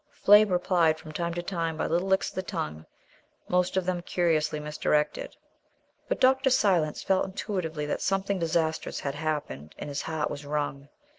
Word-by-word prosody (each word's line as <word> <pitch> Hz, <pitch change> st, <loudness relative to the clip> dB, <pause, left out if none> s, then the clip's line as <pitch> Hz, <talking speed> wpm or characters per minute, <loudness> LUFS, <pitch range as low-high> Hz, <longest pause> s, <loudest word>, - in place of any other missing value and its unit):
Flame 210 Hz, +1 st, +7 dB
replied 175 Hz, -3 st, +2 dB
from 160 Hz, -1 st, -10 dB
time 170 Hz, +1 st, -3 dB
to 175 Hz, -, -3 dB
time 165 Hz, -3 st, -2 dB
by -, -, -1 dB
little 175 Hz, +3 st, 0 dB
licks 190 Hz, 0 st, +2 dB
of -, -, -15 dB
the 185 Hz, -, -2 dB
tongue, 75 Hz, -, -5 dB, 0.6 s
most 180 Hz, +1 st, +1 dB
of 185 Hz, -, +1 dB
them 180 Hz, -1 st, -1 dB
curiously 155 Hz, -4 st, 0 dB
misdirected. 150 Hz, -, -1 dB, 0.7 s
But -, -, -1 dB
Dr. 265 Hz, +1 st, +4 dB
Silence 180 Hz, -11 st, +2 dB
felt 190 Hz, -1 st, +2 dB
intuitively 180 Hz, -6 st, -3 dB
that 150 Hz, -, -2 dB
something 195 Hz, 0 st, 0 dB
disastrous 160 Hz, -1 st, -1 dB
had 140 Hz, -, -2 dB
happened, 145 Hz, -, -4 dB
and 150 Hz, -, -6 dB
his 140 Hz, -, -3 dB
heart 160 Hz, -2 st, -2 dB
was 145 Hz, 0 st, -6 dB
wrung. 145 Hz, -1 st, -3 dB
165 Hz, 170 wpm, -27 LUFS, 150-185 Hz, 0.7 s, Flame